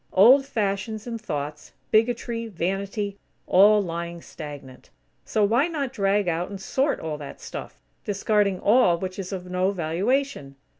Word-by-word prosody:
Old 260 Hz, +8 st, +7 dB
fashions 215 Hz, -1 st, -2 dB
in 230 Hz, -2 st, -4 dB
thoughts; 150 Hz, -7 st, -5 dB, 0.2 s
bigotry; 230 Hz, +1 st, +1 dB
vanity; 200 Hz, +2 st, -3 dB, 0.3 s
all 205 Hz, +3 st, +6 dB
lying 170 Hz, -1 st, -5 dB
stagnant. 145 Hz, -6 st, -10 dB, 0.4 s
So 215 Hz, -, +1 dB
why 235 Hz, +9 st, +3 dB
not 285 Hz, -6 st, -3 dB
drag 200 Hz, -2 st, +1 dB
out 175 Hz, +1 st, -1 dB
and 200 Hz, -1 st, -7 dB
sort 270 Hz, +8 st, 0 dB
all 155 Hz, -2 st, -4 dB
that 145 Hz, -, -9 dB
stuff, -, -, -8 dB, 0.2 s
discarding 205 Hz, -2 st, +1 dB
all 205 Hz, -6 st, +4 dB
which 185 Hz, +2 st, -5 dB
is 185 Hz, 0 st, -5 dB
of 185 Hz, -2 st, -5 dB
no 180 Hz, +1 st, 0 dB
valuation? 190 Hz, -, -1 dB
200 Hz, 145 wpm, -25 LUFS, 175-225 Hz, 0.4 s, Old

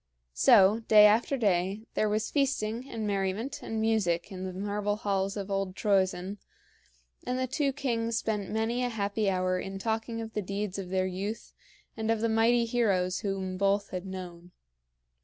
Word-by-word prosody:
So, 195 Hz, -, +6 dB
day 210 Hz, -1 st, +8 dB
after 225 Hz, +6 st, +3 dB
day, 195 Hz, -1 st, 0 dB
there 215 Hz, -, +1 dB
was 215 Hz, +1 st, -1 dB
feasting 255 Hz, -3 st, -1 dB
and 220 Hz, -2 st, -4 dB
merriment 200 Hz, +5 st, -2 dB
and 225 Hz, -, -4 dB
music 205 Hz, -7 st, +1 dB
in 185 Hz, -1 st, -5 dB
the 185 Hz, -, -4 dB
marble 205 Hz, +2 st, -2 dB
halls 195 Hz, -1 st, -1 dB
of 200 Hz, 0 st, -5 dB
old 195 Hz, -1 st, -1 dB
Troezen, 195 Hz, -1 st, 0 dB, 0.8 s
and 250 Hz, -, -2 dB
the 260 Hz, -, 0 dB
two 275 Hz, +2 st, 0 dB
kings 235 Hz, -5 st, -1 dB
spent 210 Hz, -4 st, -2 dB
many 225 Hz, +3 st, -1 dB
a 245 Hz, -, 0 dB
happy 210 Hz, -2 st, -1 dB
hour 185 Hz, -1 st, 0 dB
in 195 Hz, +1 st, -5 dB
talking 225 Hz, +2 st, -2 dB
of 225 Hz, 0 st, -6 dB
the 210 Hz, -, -1 dB
deeds 200 Hz, 0 st, -4 dB
of 185 Hz, -2 st, -6 dB
their 185 Hz, 0 st, +1 dB
youth 195 Hz, +4 st, -5 dB, 0.4 s
and 220 Hz, -1 st, -3 dB
of 225 Hz, -1 st, +2 dB
the 230 Hz, +1 st, 0 dB
mighty 230 Hz, +2 st, +3 dB
heroes 200 Hz, -6 st, +1 dB
whom 190 Hz, -2 st, -3 dB
both 200 Hz, +1 st, +1 dB
had 185 Hz, +1 st, -5 dB
known. 180 Hz, -2 st, -8 dB
205 Hz, 175 wpm, -29 LUFS, 190-225 Hz, 0.8 s, day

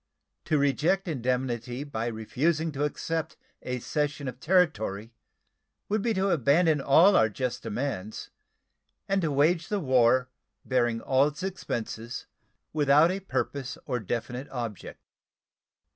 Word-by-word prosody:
To 155 Hz, -, +2 dB
reject 160 Hz, +7 st, +1 dB
indemnity 125 Hz, -2 st, -2 dB
by 115 Hz, -6 st, -3 dB
refusing 150 Hz, +9 st, -1 dB
to 145 Hz, 0 st, -1 dB
accept 160 Hz, +2 st, -3 dB, 0.2 s
a 125 Hz, 0 st, -3 dB
cession 145 Hz, +2 st, -2 dB
of 125 Hz, -, -6 dB
territory 115 Hz, -, +1 dB, 0.8 s
would 210 Hz, 0 st, +1 dB
be 230 Hz, -, 0 dB
to 190 Hz, +1 st, +1 dB
abandon 155 Hz, +1 st, +3 dB
all 170 Hz, +9 st, +6 dB
our 110 Hz, -, +5 dB
just 125 Hz, +3 st, -3 dB
demands, 110 Hz, -3 st, -4 dB, 0.8 s
and 195 Hz, 0 st, +1 dB
to 160 Hz, -3 st, 0 dB
wage 160 Hz, +4 st, +2 dB
the 205 Hz, -, -1 dB
war, 130 Hz, -4 st, +3 dB, 0.4 s
bearing 120 Hz, -3 st, +1 dB
all 135 Hz, +2 st, +3 dB
its 150 Hz, +5 st, -6 dB
expenses, 120 Hz, -10 st, -4 dB, 0.5 s
without 150 Hz, +2 st, +5 dB
a 190 Hz, -, -2 dB
purpose 140 Hz, -8 st, -3 dB
or 125 Hz, -, -1 dB
definite 120 Hz, +5 st, -4 dB
object. 115 Hz, -6 st, -6 dB
140 Hz, 130 wpm, -27 LUFS, 120-160 Hz, 0.8 s, all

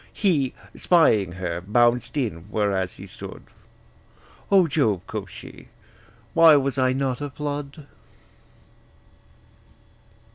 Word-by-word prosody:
He, 155 Hz, -10 st, 0 dB, 0.2 s
spying 110 Hz, -, +3 dB
her, 90 Hz, -2 st, -4 dB
bounced 120 Hz, -, +1 dB
in, 105 Hz, -, -3 dB
whereas 100 Hz, -4 st, -1 dB
he 95 Hz, -, -10 dB
stood: 95 Hz, -, -10 dB, 1.1 s
'O 195 Hz, -2 st, +6 dB
Jove,' 115 Hz, -, 0 dB
quoth -, -, -6 dB
she, -, -, -12 dB, 0.7 s
'why 165 Hz, -2 st, +7 dB
was 140 Hz, -2 st, 0 dB
not 130 Hz, 0 st, 0 dB
I -, -, -2 dB
a -, -, -6 dB
flood!' 145 Hz, +1 st, -6 dB
130 Hz, 105 wpm, -23 LUFS, 100-145 Hz, 1.1 s, why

